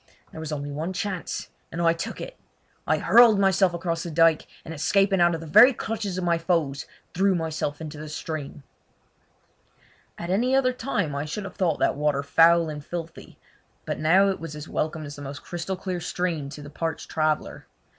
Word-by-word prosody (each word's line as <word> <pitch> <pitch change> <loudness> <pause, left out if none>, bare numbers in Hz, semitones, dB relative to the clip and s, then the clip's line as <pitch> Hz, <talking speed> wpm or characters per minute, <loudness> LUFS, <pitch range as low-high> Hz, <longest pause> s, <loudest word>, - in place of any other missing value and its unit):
There - - -9
was 160 -1 -5
only 145 -1 -4
one 160 +6 -3
chance, 185 -2 -4 0.2
and 165 - -5
I 165 -1 +4
took 165 - -5
it. - - -7 0.5
I - - +3
hurled 235 -3 +6
myself 190 -1 +3
across 170 -1 -2
the 175 - -5
dyke, 165 0 +3 0.2
and 160 - -6
escaping 195 +4 +2
out 175 -1 +4
of 165 - -6
the - - -8
very 220 - +7
clutches 215 -5 -4
of 185 - -2
my 170 -1 +1
foes 165 -5 -1 0.3
threw 190 +1 +2
myself 160 -3 -3
into 155 -2 -7
the 155 0 -7
stream. 150 -2 -6 1.5
At 170 +1 -4
any 245 +7 +2
other 255 -1 +3
time 230 - -2
I 140 +1 -3
should 175 +7 -5
have 195 - -8
thought 170 -5 +1
that - - +2
water 145 -1 0
foul 165 +3 +5
and 150 -2 -6
filthy, 165 +1 -8 0.5
but - - -3
now 185 +6 +4
it 195 - -2
was 165 -2 -7
as 150 +1 -8
welcome 155 0 -2
as 145 0 -8
the - - -9
most 140 0 -7
crystal 175 +2 -4 0.2
stream 165 -4 -2
to 145 +1 -9
the 145 - -10
parched 165 +1 -4
traveller. 155 -1 -1
165 Hz, 195 wpm, -25 LUFS, 150-185 Hz, 1.5 s, very